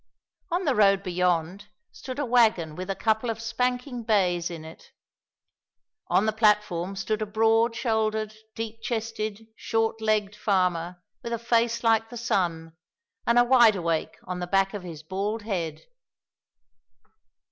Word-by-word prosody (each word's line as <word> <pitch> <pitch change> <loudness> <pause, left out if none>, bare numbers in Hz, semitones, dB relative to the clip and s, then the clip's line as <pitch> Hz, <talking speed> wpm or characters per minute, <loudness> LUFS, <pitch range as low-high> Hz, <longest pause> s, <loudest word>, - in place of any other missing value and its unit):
On 350 +2 -1
the 280 - +3
road 195 -3 +4
beyond 180 +1 -1 0.2
stood 260 0 -8
a 290 - -1
wagon 220 -10 +3
with 185 +3 -6
a 195 - -1
couple 220 +3 0
of 225 0 -3
spanking 250 +2 -2
bays 185 -6 +1
in 165 -2 -8
it. 160 - -13 1.2
On 205 - +3
the 220 - +1
platform 210 -4 +2
stood 215 +3 -2
a - - 0
broad 225 +2 +2
shouldered, 220 -2 -1 0.2
deep 225 0 -6
chested, 225 -2 -3
short 225 0 -1
legged 210 -2 +1
farmer 180 -4 0 0.2
with 235 - -5
a - - 0
face 235 0 +1
like 225 -1 +3
the 240 - -8
sun, 170 -8 -1 0.5
and 235 - +4
a 245 - +7
wide 240 -3 +6
awake 165 -3 -2
on 180 -1 -5
the 180 - -4
back 195 +2 +2
of 205 - -5
his 165 -4 -9
bald 200 +6 -3
head. 170 -8 -3
215 Hz, 150 wpm, -26 LUFS, 180-225 Hz, 1.2 s, a